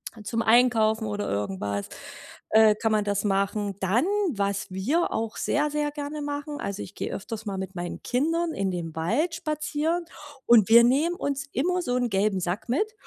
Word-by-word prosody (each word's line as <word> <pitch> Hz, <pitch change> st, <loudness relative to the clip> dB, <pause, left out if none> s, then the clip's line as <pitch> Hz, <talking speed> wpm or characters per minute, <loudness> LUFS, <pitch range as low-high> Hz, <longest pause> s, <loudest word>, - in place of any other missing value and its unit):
Halt, 210 Hz, -2 st, -11 dB
zum 230 Hz, +2 st, -1 dB
Einkaufen 225 Hz, -2 st, +3 dB
oder 205 Hz, 0 st, -3 dB
irgendwas, 100 Hz, 0 st, -2 dB, 0.6 s
äh, 220 Hz, -1 st, +6 dB
kann 225 Hz, +1 st, -1 dB
man 215 Hz, -1 st, +2 dB
das 205 Hz, -1 st, -1 dB
machen. 200 Hz, 0 st, 0 dB
Dann, 210 Hz, -, +2 dB, 0.3 s
was 200 Hz, -4 st, -2 dB
wir 255 Hz, -, 0 dB
auch 225 Hz, 0 st, -3 dB
sehr, 295 Hz, 0 st, 0 dB
sehr 295 Hz, 0 st, 0 dB
gerne 295 Hz, +1 st, -5 dB
machen, 290 Hz, 0 st, -4 dB
also 200 Hz, 0 st, -4 dB
ich 185 Hz, -, -11 dB
gehe -, -, -4 dB
öfters 220 Hz, +1 st, -6 dB
mal 195 Hz, -1 st, -3 dB
mit 190 Hz, 0 st, -5 dB
meinen 175 Hz, -2 st, -6 dB
Kindern 325 Hz, +6 st, 0 dB
in 195 Hz, -1 st, -1 dB
den 170 Hz, -3 st, -5 dB
Wald 235 Hz, -, 0 dB
spazieren 310 Hz, +1 st, -2 dB, 0.4 s
und 225 Hz, -4 st, +6 dB
wir 235 Hz, +1 st, +8 dB
nehmen 290 Hz, +8 st, +2 dB
uns 280 Hz, -3 st, -3 dB
immer 360 Hz, +7 st, 0 dB
so 250 Hz, -7 st, -1 dB
'nen 245 Hz, -1 st, 0 dB
gelben 195 Hz, 0 st, +1 dB
Sack 180 Hz, +6 st, -3 dB
mit. 420 Hz, -, 0 dB
225 Hz, 185 wpm, -26 LUFS, 200-290 Hz, 0.6 s, wir